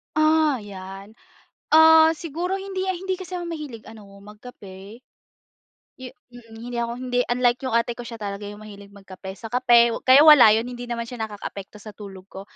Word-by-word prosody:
Ah, 310 -2 +2
yan. 195 0 -11 0.6
Ah 320 0 +7
siguro 340 +4 -4
hindi 385 -1 -5
a 375 - -1
hindi 375 +1 -4
kasi 370 0 -8
ako 350 -1 -5
mahilig 300 -9 -8
ano 220 -2 -13 0.2
magkape. 210 -1 -13 1.0
Yu 260 - -8 0.2
mhm. 230 -2 -15
Hindi 240 0 -6
ako 235 0 -3
hindi 250 0 -3
unlike 245 0 +1
yung 230 - -2
ate 235 +1 0
ko, 240 0 -9
siya 230 - -8
talaga 205 -2 -7
yung 205 +1 -11
mahilig 200 -1 -13
magkape 195 -1 -12
sa 225 +1 -11
kape. 240 -1 +4 0.2
Kaya 265 +3 +7
wala 300 -7 +8
yun, 225 - -1
hindi 245 0 -8
naman 235 -1 -4
siya 240 +1 -10
nakakaapekto 200 -1 -9
sa 210 +1 -11
tulog 195 -2 -12
ko. 190 - -9
235 Hz, 180 wpm, -22 LUFS, 205-300 Hz, 1.0 s, wala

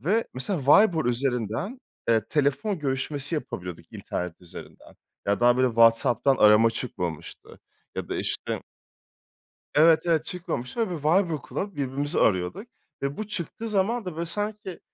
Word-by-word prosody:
ve 205 - +1
mesela 150 +7 0
Viber 170 -1 +5
üzerinden, 125 - -1 0.3
eee, 110 -2 +3
telefon 155 +7 0
görüşmesi 140 +2 -1
yapabiliyorduk 90 - -6
internet 90 -1 -5
üzerinden. 90 - -13 0.3
Ya 100 +3 +1
daha 120 0 +5
böyle 130 0 +3
WhatsApp'tan 115 +3 +4
arama 105 +2 +6
çıkmamıştı 90 - -6 0.4
ya - - -4
da - - -3
işte - - -3 1.1
Evet, 160 +1 +6
evet 160 -2 +1
çıkmamıştı 175 - -4
ve 220 - -1
biz - - -6
Viber 165 -1 +2
kullanıp 200 -3 -5
birbirimizi 140 +1 -2
arıyorduk 95 - +1 0.3
ve 140 +1 -3
bu 215 - -4
çıktığı 210 +3 -5
zaman 215 +2 0
da 180 -4 -5
böyle 170 +1 -3
sanki, 205 0 -3
145 Hz, 140 wpm, -26 LUFS, 120-185 Hz, 1.1 s, arama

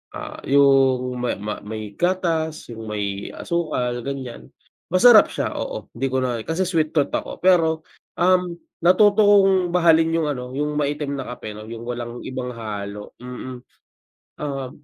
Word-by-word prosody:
Ah, - - -7
yung 135 -2 +3
ma 120 0 -1
ma 105 +1 -4
may 110 0 -7
gatas, 165 -6 -1
yung 110 -1 -8
may 100 -2 -4
asukal 150 -8 -2
ganyan. 130 -1 -6 0.4
Masarap 215 +5 +7
siya - - -3
oo - - -5
di 135 - -2
ko 130 0 0
na, 120 -2 -1
kasi 165 +3 0
sweet 165 -4 0
tooth 145 - +2
ako, - - -3
pero, 160 -4 +3 0.3
um, 180 -1 +2 0.2
natuto 200 +4 +5
akong 195 -3 +5
mahalin 165 -1 +4
yung 160 -2 +1
ano 125 -1 -6
yung 150 +1 -1
maitim 145 -1 -2
na 130 - -5
kape 110 - -8
'no 105 +1 -10
yung 115 0 -7
walang 120 0 -5
ibang 125 -1 -5
halo, 105 -2 -6
mm. 125 0 -7 0.8
Um, 135 -3 -4
140 Hz, 155 wpm, -22 LUFS, 120-170 Hz, 0.8 s, Masarap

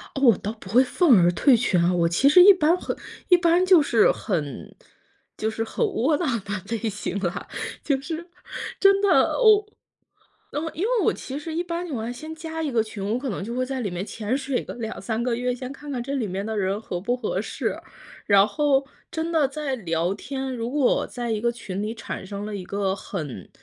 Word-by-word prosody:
我 255 -7 +5
倒 210 - -4
不 215 -4 -13
会 245 +6 +5
愤 265 - +4
而 175 0 +4
退 250 - +4
群， 215 -6 +2
啊， 175 +1 +2
我 170 -1 +2
其 175 +11 +3
实 355 +5 +8
一 400 +2 +10
般 335 -2 +3
很 - - -4 0.3
一 360 - +7
般 345 +1 +3
就 370 -4 +7
是 235 -6 +4
很 155 -9 -4 0.6
就 220 - -1
是 225 +1 -3
很 340 - -1
窝 300 - +1
囊 335 - -1 0.2
的 200 +2 -4
类 225 0 -2
型 205 -1 -4
了， 180 -2 -3 0.4
就 280 -3 +1
是 335 +4 -6 0.5
真 395 0 +5
的 405 - +3
我 430 -3 +6 0.9
嗯， 295 - -2
因 335 - -4
为 475 +1 +2
我 - - +4
其 270 +2 -6
实 315 +2 -6
一 340 - 0
般 345 0 -4
情 315 - -5
况 230 0 -3
先 310 +6 -8
加 320 0 -5
一 305 - -1
个 235 -3 +2
群， 215 -2 -7
我 235 - +1
可 270 +1 -4
能 195 - -4
就 230 +4 -5
会 255 +1 0
在 265 0 -4
里 210 -5 -2
面 175 +2 -4
潜 220 +3 -2
水 270 -2 -2
个 - - -8
2-3 225 0 -4
个 245 -1 0
月， 250 +1 -1
先 255 +1 -6
看 290 +1 -10
看 250 -3 -2
这 275 +3 -4
里 255 -6 -1
面 195 +1 -4
的 220 0 -3
人 195 0 0
合 180 -5 -5
不 240 +6 -1
合 215 -6 -2
适。 - - -3 0.5
然 200 -1 +6
后 275 +3 +1 0.2
真 330 -1 -3
的 315 -4 +3
在 280 -1 -3
聊 170 -3 -1
天 265 +4 -5
如 235 0 -3
果 275 -2 +2
在 240 -1 -5
一 220 -1 -1
个 235 +2 +1
群 200 -4 -5
里 215 +2 -3
产 230 - -6
生 200 +1 -6
了 210 0 -5
一 190 - -6
个 195 0 -1
很 150 - -6
245 Hz, 240 characters per minute, -24 LUFS, 205-295 Hz, 0.9 s, 一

